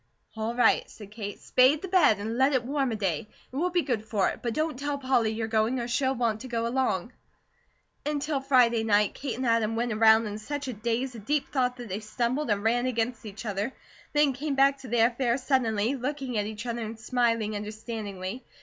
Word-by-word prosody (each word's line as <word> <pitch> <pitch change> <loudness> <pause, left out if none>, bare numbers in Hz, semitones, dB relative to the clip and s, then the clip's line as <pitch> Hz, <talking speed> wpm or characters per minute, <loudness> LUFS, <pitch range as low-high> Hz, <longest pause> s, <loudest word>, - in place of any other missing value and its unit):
"All 220 +2 -2
right," 245 - +3
said 205 -2 -12
Kate. 205 -2 -6
"Spade 265 +6 +3
the - - -3
bed, 350 - +4
and 220 +3 -4
let 265 +3 +3
it 255 -2 +2
warm 275 -1 0
a - - -1
day. 195 -4 -2 0.3
It - - -8
will 340 +6 +1
be 350 -1 +1
good 240 -6 -1
for 210 -3 +1
it. - - -6
But 235 -2 -2
don't 310 -1 0
tell 285 0 -2
Polly 260 -4 +2
you're 220 0 -2
going, 225 +3 +1
or 235 - -3
she'll 260 +2 +1
want 230 -3 0
to 260 - -7
go 230 -2 -1
along." 240 -3 -1 0.9
Until 295 -1 -1
Friday 245 -4 +4
night, 210 -2 +3
Kate 260 -5 -4
and 260 - -2
Adam 230 -1 +2
went 235 0 0
around 220 +1 +5
in 210 0 -5
such 285 +5 -5
a 255 - -3
daze 235 +4 -2
of 215 -3 -11
deep 295 -1 0
thought 250 -2 0
that 245 -1 -7
they 190 +3 -3
stumbled, 240 +6 -2
and 205 -1 +1
ran 240 +3 +2
against 235 -2 -2
each 210 +3 -8
other; 210 +4 -2 0.4
then 295 -2 +4
came 280 +2 -3
back 275 0 +4
to 265 - -10
their 230 -1 +4
affairs 245 +1 -1
suddenly, 235 -4 +1
looking 270 -1 -3
at 210 -1 0
each 215 +2 -6
other 235 -1 -3
and 220 0 -6
smiling 230 -3 0
understandingly. 210 0 -5
235 Hz, 220 wpm, -27 LUFS, 220-265 Hz, 0.9 s, around